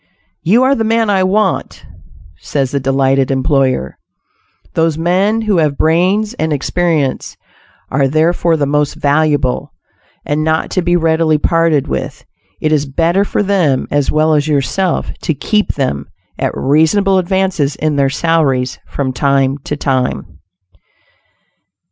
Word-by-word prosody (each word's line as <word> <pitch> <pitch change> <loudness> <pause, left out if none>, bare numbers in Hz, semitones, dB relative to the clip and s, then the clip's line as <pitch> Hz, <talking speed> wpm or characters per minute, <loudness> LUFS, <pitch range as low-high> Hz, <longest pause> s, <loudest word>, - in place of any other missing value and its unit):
"You 225 +9 +3
are 265 +1 +3
the 230 - -1
man 225 -1 +1
I 190 -2 +2
want," 190 +1 -1 0.5
says 135 +5 -2
the 140 - -1
delighted 135 0 +1
employer. 130 - 0 0.7
Those 160 -1 +1
men 190 +7 +1
who 215 -4 0
have 150 -3 0
brains 185 +7 +1
and 160 0 -1
experience 150 -1 -1 0.5
are 135 0 +2
therefore 165 +3 +1
the 145 - 0
most 145 0 0
valuable 145 -3 0 0.5
and 150 +1 -1
not 160 0 0
to 185 - 0
be 175 0 +1
readily 160 -2 +2
parted 165 -2 +1
with; - - -5 0.3
it 155 - -1
is 150 -2 +1
better 170 +7 +1
for 205 - -1
them, 180 -10 +1
as 145 -1 0
well 155 +1 +2
as 150 0 +1
yourself, 155 +5 -1
to 160 - -1
keep 210 +8 0
them, 70 - -2 0.3
at - - -2
reasonable 185 +8 +2
advances 185 -6 0
in 155 -1 -1
their 140 -1 +2
salaries 140 -4 0
from 130 -2 -3
time 135 +1 +1
to 150 - -3
time. 130 -3 -2
155 Hz, 140 wpm, -14 LUFS, 140-180 Hz, 0.7 s, You